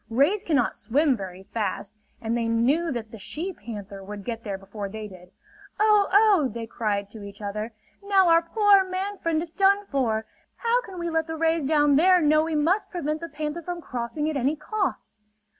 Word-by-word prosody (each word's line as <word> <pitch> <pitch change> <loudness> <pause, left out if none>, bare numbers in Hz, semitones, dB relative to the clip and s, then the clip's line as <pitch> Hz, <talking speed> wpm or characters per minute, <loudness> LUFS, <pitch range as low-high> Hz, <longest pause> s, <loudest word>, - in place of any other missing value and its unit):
Rays 285 - +2
cannot 275 -8 +1
swim 270 +5 +2
very 190 -3 -8
fast, 210 0 -4 0.2
and 230 0 -2
they 230 -1 0
knew 265 +9 +2
that 225 -4 -5
the 225 - -10
she 340 - -5
panther 205 - -8
would 205 0 -8
get 230 -1 -4
there 200 -3 -4
before 200 +1 -7
they 215 +1 -6
did. 180 -2 -14 0.5
"Oh, 420 -1 +4
oh!" 400 -8 +5
they 230 -1 -5
cried 210 -3 -2
to 220 - -10
each 200 0 -10
other. 210 +2 -4 0.3
"Now 395 -2 +3
our 335 0 +6
poor 400 +3 +4
man 380 +2 -4
friend 325 -1 0
is 330 -1 -11
done 400 +1 +3
for. 230 - -1 0.3
How 475 +1 +1
can 385 -6 -10
we 340 -1 -3
let 320 0 0
the 320 0 -4
rays 325 -1 +1
down 295 -1 +4
there 365 +3 +6
know 305 -1 +4
we 325 -1 -2
must 335 +8 +1
prevent 310 -3 -3
the 335 - -6
panther 305 +2 -4
from 350 +1 -5
crossing 255 +1 -3
at 310 - -2
any 275 +3 +1
cost?" 385 - -3
295 Hz, 200 wpm, -25 LUFS, 225-345 Hz, 0.5 s, our